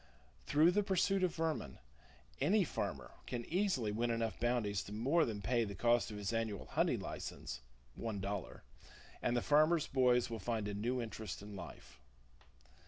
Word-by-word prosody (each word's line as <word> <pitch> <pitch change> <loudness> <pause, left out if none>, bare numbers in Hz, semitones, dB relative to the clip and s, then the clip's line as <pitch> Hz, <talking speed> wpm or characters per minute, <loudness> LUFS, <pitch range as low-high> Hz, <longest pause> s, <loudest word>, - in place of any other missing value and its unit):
Through 155 +4 +5
the 205 +3 +3
pursuit 195 -1 +2
of 180 -2 +1
vermin, 160 - -2 0.6
any - - +4
farmer - - -3 0.2
can 120 -2 -3
easily 175 - +1
win 115 +3 0
enough 115 -4 -1
bounties 115 -5 +1
to - - -9
more 135 +10 +2
than 105 -4 -4
pay 120 +2 +2
the 100 -2 -5
cost 120 +4 +3
of 105 - -6
his 105 +2 -2
annual 110 -3 -2
hunting - - +1
license - - -6 0.3
(one 110 - -4
dollar), 100 -1 -4 0.6
and 120 0 +1
the 120 - 0
farmers' 155 +2 +4
boys 125 -2 +3
will 115 -1 -5
find 110 0 -2
a 105 - -3
new 120 +5 -1
interest 110 -4 -5
in 105 0 -8
life. 85 -4 -10
115 Hz, 170 wpm, -36 LUFS, 105-140 Hz, 0.6 s, Through